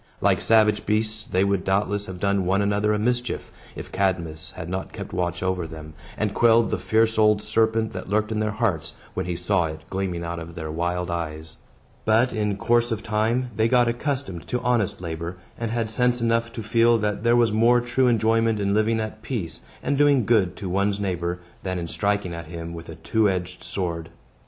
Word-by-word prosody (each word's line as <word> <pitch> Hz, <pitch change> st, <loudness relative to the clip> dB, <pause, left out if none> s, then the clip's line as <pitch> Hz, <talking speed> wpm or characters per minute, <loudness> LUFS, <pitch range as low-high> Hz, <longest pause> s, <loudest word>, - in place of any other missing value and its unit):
Like -, -, +2 dB
savage 110 Hz, -2 st, +3 dB
beasts, 110 Hz, 0 st, 0 dB
they 95 Hz, +1 st, +2 dB
would 100 Hz, -2 st, +1 dB
doubtless 100 Hz, +1 st, 0 dB
have 95 Hz, -1 st, -7 dB
done 100 Hz, 0 st, +1 dB
one 95 Hz, +3 st, +2 dB
another 105 Hz, +1 st, +1 dB
a 105 Hz, -, +2 dB
mischief, 120 Hz, +3 st, -1 dB, 0.2 s
if -, -, -8 dB
Cadmus 90 Hz, -5 st, -1 dB
had 80 Hz, -, -7 dB
not 95 Hz, +2 st, -4 dB
kept -, -, -7 dB
watch 90 Hz, 0 st, -1 dB
over 95 Hz, -3 st, -1 dB
them, 80 Hz, -1 st, -9 dB, 0.2 s
and 105 Hz, -1 st, -1 dB
quelled 115 Hz, +1 st, +4 dB
the -, -, 0 dB
fierce 110 Hz, 0 st, +2 dB
old 105 Hz, -1 st, +5 dB
serpent 110 Hz, +1 st, +1 dB
that 95 Hz, 0 st, -6 dB
lurked 110 Hz, +1 st, +1 dB
in 110 Hz, -, -1 dB
their 110 Hz, 0 st, 0 dB
hearts, 100 Hz, -8 st, -1 dB, 0.2 s
when -, -, -3 dB
he 90 Hz, -, -2 dB
saw 90 Hz, +1 st, +1 dB
it 80 Hz, 0 st, -6 dB
gleaming 95 Hz, -3 st, -2 dB
out 85 Hz, 0 st, -4 dB
of 85 Hz, 0 st, -9 dB
their 80 Hz, -2 st, -5 dB
wild 90 Hz, +2 st, -1 dB
eyes. 80 Hz, -2 st, -5 dB, 0.5 s
But, 115 Hz, +4 st, +3 dB
in 105 Hz, -3 st, -1 dB
course 120 Hz, +2 st, +2 dB
of 110 Hz, -1 st, -2 dB
time, 115 Hz, +3 st, 0 dB
they 110 Hz, +1 st, +3 dB
got 120 Hz, 0 st, +4 dB
accustomed 120 Hz, -, -3 dB
to 125 Hz, -, -1 dB
honest 120 Hz, -7 st, 0 dB
labor, 85 Hz, +1 st, -5 dB, 0.2 s
and 115 Hz, -1 st, -3 dB
had 115 Hz, -1 st, -1 dB
sense 125 Hz, +1 st, +2 dB
enough 115 Hz, 0 st, +1 dB
to 115 Hz, -, -5 dB
feel 115 Hz, +2 st, +4 dB
that 105 Hz, -2 st, -1 dB
there 120 Hz, 0 st, +4 dB
was 120 Hz, -2 st, +4 dB
more 115 Hz, +3 st, +4 dB
true 120 Hz, +2 st, +1 dB
enjoyment 115 Hz, -1 st, +2 dB
in 100 Hz, 0 st, +1 dB
living 110 Hz, +2 st, +2 dB
at 110 Hz, 0 st, -5 dB
peace, 105 Hz, -11 st, -4 dB, 0.2 s
and 140 Hz, -1 st, 0 dB
doing 140 Hz, -5 st, +4 dB
good 100 Hz, -6 st, +3 dB
to 100 Hz, -, -6 dB
one's 100 Hz, +2 st, 0 dB
neighbor, 90 Hz, -3 st, -2 dB, 0.2 s
than 95 Hz, -1 st, -3 dB
in 85 Hz, -, -3 dB
striking 100 Hz, +1 st, -1 dB
at 85 Hz, -1 st, -7 dB
him 85 Hz, 0 st, -6 dB
with 85 Hz, 0 st, -9 dB
a -, -, -7 dB
two 110 Hz, -2 st, +1 dB
edged 90 Hz, -1 st, -3 dB
sword. 85 Hz, -4 st, -3 dB
105 Hz, 205 wpm, -24 LUFS, 90-115 Hz, 0.5 s, old